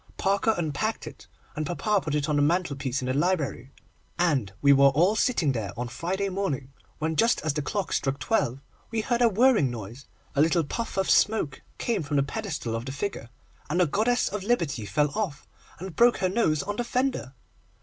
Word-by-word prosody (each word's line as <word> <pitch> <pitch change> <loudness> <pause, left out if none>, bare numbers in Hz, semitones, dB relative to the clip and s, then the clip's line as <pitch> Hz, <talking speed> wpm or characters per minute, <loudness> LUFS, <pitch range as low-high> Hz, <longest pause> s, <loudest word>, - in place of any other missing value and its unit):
Parker 200 +3 +2
unpacked 175 +7 -2
it, - - -11 0.3
and 155 - -2
papa 195 +6 0
put 150 -3 -2
it 150 0 0
on 150 - +1
the - - +3
mantelpiece 140 -5 0
in - - -2
the 130 - 0
library, 145 -5 -1 0.5
and 145 - +1
we 140 0 +6
were 140 0 +6
all 170 +10 +3
sitting 215 - +2
there 110 -6 -3
on 120 0 -3
Friday 190 +9 -2
morning, 180 -9 -3 0.3
when 160 +1 -2
just 230 +7 +3
as 155 -2 -1
the 150 - -1
clock 185 +4 -2
struck 135 0 0
twelve, 135 - 0 0.3
we 225 -1 -1
heard 240 +1 0
a 235 - +6
whirring 220 - +4
noise, 120 +3 -8 0.3
a 140 - +4
little 165 +2 +3
puff 225 +9 -4
of 190 - +1
smoke 180 -11 +2 0.2
came 230 -6 -1
from 145 -1 -2
the 140 - +4
pedestal 155 - -4
of 115 +1 -4
the - - -3
figure, 140 - -4 0.4
and 175 +4 0
the 180 - +5
goddess 225 - +1
of 210 +1 -3
Liberty 170 - -1
fell 150 +3 +1
off, 185 -6 -3 0.3
and 185 -2 -8
broke 240 +5 +5
her 185 - 0
nose 180 -7 +1
on 205 +1 -4
the 240 - 0
fender! 250 - -1
160 Hz, 200 wpm, -26 LUFS, 140-205 Hz, 0.5 s, we